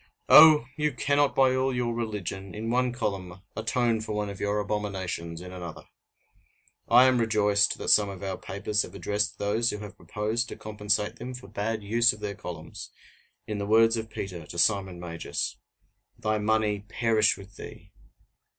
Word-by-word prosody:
Oh! 155 -5 +9
you 150 -1 0
cannot 140 +3 +1
by 130 -1 +4
all 130 0 0
your 120 -1 -1
religion, 100 -5 -5
in 110 +2 -3
one 125 0 +1
column, 95 -6 -4
atone 115 0 0
for 110 -1 -5
one 105 -1 -2
of 100 - -10
your 100 +1 0
abominations 95 -5 -4
in 90 0 -9
another! 90 -3 -8 1.1
I 125 +2 +7
am 130 -1 +3
rejoiced 105 -2 +2
that - - -3
some 105 -1 +5
of 100 0 -8
our 95 -1 -2
papers 105 +2 -1
have - - -7
addressed 105 0 -1
those 110 +4 0
who - - -3
have 105 -1 -9
proposed 110 +4 -2
to - - -7
compensate 105 -1 -2
them 125 +1 -7
for 125 -5 -11
bad 105 +1 -3
use 115 +4 +3
of 105 - -12
their 105 -1 -4
columns, - - -8 0.6
in 105 -1 -4
the 100 - -3
words 115 +1 +5
of 110 -1 -4
Peter 90 -7 -6
to 85 - -9
Simon 95 -1 +1
Magus: 85 -1 -4 0.6
"Thy 110 0 -1
money 105 -1 +1
perish 110 -1 +2
with 100 +1 -14
thee!" - - -11
105 Hz, 175 wpm, -27 LUFS, 100-115 Hz, 1.1 s, Oh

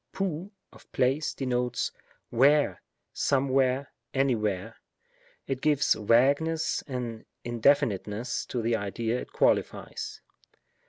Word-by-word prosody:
izoify 185 -1 -2 0.2
of - - -18
place, 135 +4 +1
denotes 125 -2 -1 0.4
wlwre^ 145 +5 +4 0.3
somewhere^ 135 0 +2 0.3
anywhere; 110 -8 0 0.7
it 135 -1 -3
gives 145 -2 +3
vagueness 140 +9 +2
and 120 -4 -4 0.2
indefiniteness 115 -2 +1
to 120 -2 -3
the 115 +1 +2
idea 110 +3 -2
it - - -10
qualifies. - - 0
130 Hz, 95 wpm, -28 LUFS, 115-140 Hz, 0.7 s, wlwre^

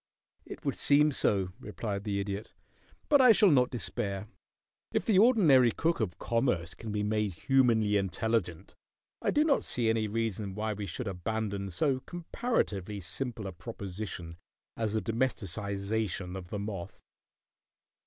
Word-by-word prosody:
"It - - -9
would - - +1
seem 150 +1 +4
so," 100 -8 +1
replied 105 -2 -5
the 100 -1 -1
Idiot. 100 +2 -4 0.5
"But 285 -2 +6
I 250 -2 +8
shall 205 -3 +6
not 125 -3 +4
despair. 105 -5 -3 0.7
If - - 0
the 205 -4 +4
ordinary 165 - +6
cook 165 +7 0
of 100 -7 -2
commerce 115 -8 0
can 110 -2 -7
be 105 0 -1
made 105 -2 0
humanly 110 -1 +3
intelligent 95 -2 -1 0.5
I - - 0
do 300 - +3
not 305 -3 +2
see 115 -2 0
any 110 -1 +1
reason 105 -3 -2
why 110 +1 -1
we 105 -1 -5
should 110 +7 -5
abandon 100 +1 -3
so 130 - +1
comparatively 130 - -2
simple 115 +4 -4
a 95 - -4
proposition 95 -4 -7 0.4
as 110 -2 -1
the 110 -2 0
domesticization 100 -4 -2
of 90 -2 -7
the 105 - -3
moth." 100 -3 -6
110 Hz, 145 wpm, -30 LUFS, 100-125 Hz, 0.7 s, I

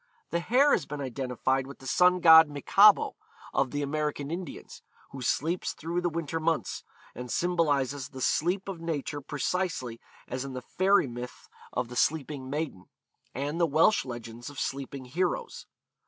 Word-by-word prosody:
The 170 - +1
hare 255 +11 +4
has - - +1
been 150 - -5
identified 130 0 -1
with 140 - -10
the 135 - -15
sun 180 +5 +4
god 160 -2 +9
Michabo 195 +8 +5 0.4
of 135 -1 +1
the 145 +2 -2
American 150 0 -2
Indians, 170 -3 -7 0.3
who 135 - -8
sleeps 165 +8 -1
through 170 +3 -3
the 175 - +1
winter 165 -1 -3
months, 165 0 -1 0.3
and 125 0 -7
symbolises 145 -5 0
the 130 - -10
sleep 180 +9 0
of 185 -4 -6
nature 145 -3 -3
precisely 145 -4 -2 0.3
as 130 +1 -4
in 135 -1 -6
the 125 -1 -6
fairy 195 +5 +3
myth 120 0 -8 0.2
of 125 -1 -2
the 125 - -9
Sleeping 140 -2 0
Maiden, 145 - -4 0.5
and 145 +6 -2
the 170 - +4
Welsh 160 +8 +4
legends 120 -1 -8
of 145 - -9
Sleeping 135 -1 -4
Heroes. 180 - -2
145 Hz, 160 wpm, -28 LUFS, 130-170 Hz, 0.5 s, god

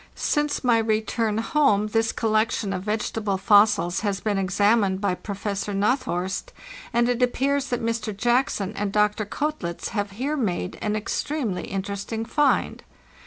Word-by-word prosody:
Since 295 -1 0
my 240 -2 +4
return 220 0 0
home 225 -4 +2
this 225 +1 +1
collection 215 -2 0
of 185 - -3
vegetable 210 0 -1
fossils 205 -3 +4
has 200 -2 -1
been 205 -2 -1
examined 200 +1 +2
by 200 -2 0
Professor 200 +1 -4
Na 210 +6 +3
thorst, 190 - -4 0.4
and 235 0 +2
it 245 0 0
appears 275 +3 +1
that 245 -2 -2
Mr. 230 -1 -1
Jackson 240 -4 +1
and 205 -1 -2
Dr. 210 0 +1
Koetlitz 285 - -3
have 205 -2 -2
here 270 +8 -2
made 185 - -2
an 210 0 -1
extremely 220 -1 -2
interesting 200 +3 -4
find. 290 +4 +1
215 Hz, 145 wpm, -24 LUFS, 200-240 Hz, 0.4 s, my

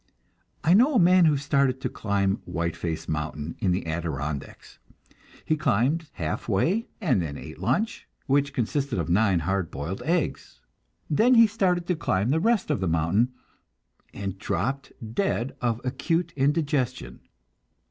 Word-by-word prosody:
I 165 - +4
know 255 +8 +5
a - - +6
man 180 0 +6
who 150 -2 +4
started 140 -2 +1
to - - -1
climb 100 -2 -1
Whiteface 85 0 -3
mountain 75 0 -3
in 95 - +1
the 90 0 -1
Adirondacks. 75 -3 -5 0.7
He 155 - +2
climbed 150 +2 +1
half 80 +5 -4
way, 180 - +1
and 135 - +2
then 75 -4 -4
ate - - -10
lunch, 220 +2 -1 0.2
which 140 0 +2
consisted 135 0 -1
of 85 -2 -2
nine 95 -1 +3
hard 95 +1 -1
boiled 80 +8 -5
eggs. 170 0 -2 0.5
Then 230 - +4
he 230 -1 +8
started 185 -5 0
to 180 - 0
climb 105 - 0
the 160 - +2
rest 220 -3 +1
of 145 - 0
the 95 - -1
mountain, 85 +10 +2 0.8
and 100 -1 -5
dropped 135 +6 -2 0.2
dead 135 - -1
of 120 -2 0
acute 165 +6 -1
indigestion. 140 - 0
130 Hz, 145 wpm, -26 LUFS, -, 0.8 s, he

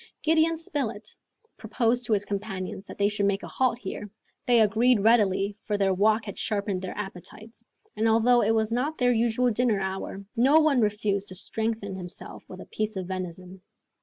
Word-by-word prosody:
Gideon 320 +1 +3
Spilett 230 -10 -4 0.4
proposed 240 -1 0
to 225 - +2
his 205 -1 +1
companions 195 -2 -5
that - - -10
they 200 - +3
should 205 -1 0
make 200 0 -1
a - - -6
halt 255 -3 0
here. 205 -1 -7 0.4
They 240 -1 +5
agreed 225 +2 +3
readily, 205 -2 +3
for 210 - -1
their 195 -1 +2
walk 215 +3 +2
had 200 - -7
sharpened 200 -3 -2
their 185 - -6
appetites; 210 +4 -9 0.3
and 220 +1 +1
although 235 +2 +4
it 220 +2 +2
was 220 0 0
not 275 +7 -1
their 245 -1 +3
usual 235 +2 +1
dinner 230 -2 +1
hour, 195 +1 -5
no 270 +7 +5
one 300 -5 +3
refused 205 -2 0
to 185 - -5
strengthen 220 +1 -3
himself 180 -1 -7
with - - -9
a - - -10
piece 215 0 -3
of 190 -1 -4
venison. 185 0 -7
215 Hz, 185 wpm, -26 LUFS, 195-235 Hz, 0.4 s, They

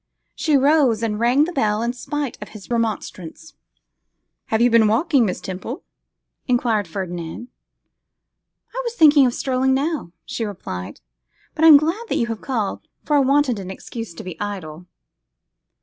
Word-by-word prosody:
She 305 -3 +2
rose 270 -5 +3
and 210 -2 -1
rang 245 +5 +4
the 340 - -2
bell 215 -5 0
in 240 +1 -1
spite 285 +1 -4
of 210 - -8
his 200 - -14
remonstrance. 225 - -3
'And - - -44 0.9
have 220 - 0
you 240 +1 +4
been 225 -2 +5
walking, 250 +2 +2
Miss 180 - -3
Temple?' 190 +8 -6 0.6
enquired 235 -5 +1
Ferdinand. 175 +4 -6 1.2
'I - - -2
was 475 -1 -4
thinking 295 - +6
of 245 - -1
strolling 265 0 +1
now,' 290 - -2
she 250 -2 -4
replied, 175 - -6 0.5
'but 320 +1 +2
I - - +9
am 305 -3 +11
glad 335 +10 -1
that - - 0
you 235 - +1
have 225 -2 -4
called, 225 -7 -2 0.2
for 295 - +1
I - - +5
wanted 275 -4 +2
an 190 -1 -7
excuse 215 0 -8
to - - -8
be 180 -3 -8
idle. 180 -5 -6
235 Hz, 165 wpm, -21 LUFS, 205-285 Hz, 1.2 s, am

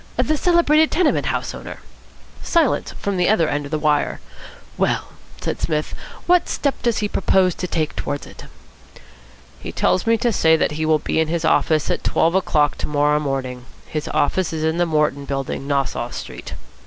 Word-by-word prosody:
"The 310 - +2
celebrated 315 -1 +4
tenement 340 -2 +1
house - - -2
owner?" - - -8 0.6
Silence 330 -6 +1
from 200 -2 -3
the 180 - +2
other 185 -7 +3
end 145 -1 -2
of 140 - -9
the 155 - 0
wire. 150 -1 +1 0.6
"Well," - - 0 0.3
said - - -4
Psmith, 155 -2 -1 0.3
"what 355 0 +3
step 280 -2 -1
does 235 -2 +1
he - - +1
propose 190 -2 +2
to 180 - -4
take 155 -3 -2
towards 145 - -4
it?" - - -12 1.1
"He - - -7
tells 185 - +1
me 230 0 +4
to 235 +1 0
say 160 -4 +4
that - - +1
he 155 +1 -2
will 155 -1 +4
be 155 - -1
in 160 - +2
his 165 0 -1
office 155 -2 +2
at - - -2
twelve 165 +1 +2
o'clock 150 -6 +1
to - - -2
morrow 150 0 +2
morning. 130 -3 -3 0.2
His 155 -1 -4
office 180 +4 0
is 160 -1 -3
in 160 +1 0
the 175 - +2
Morton 150 -3 0
Building, 135 0 -4
Nassau 135 -4 -1
Street." - - -8
160 Hz, 185 wpm, -21 LUFS, 145-195 Hz, 1.1 s, celebrated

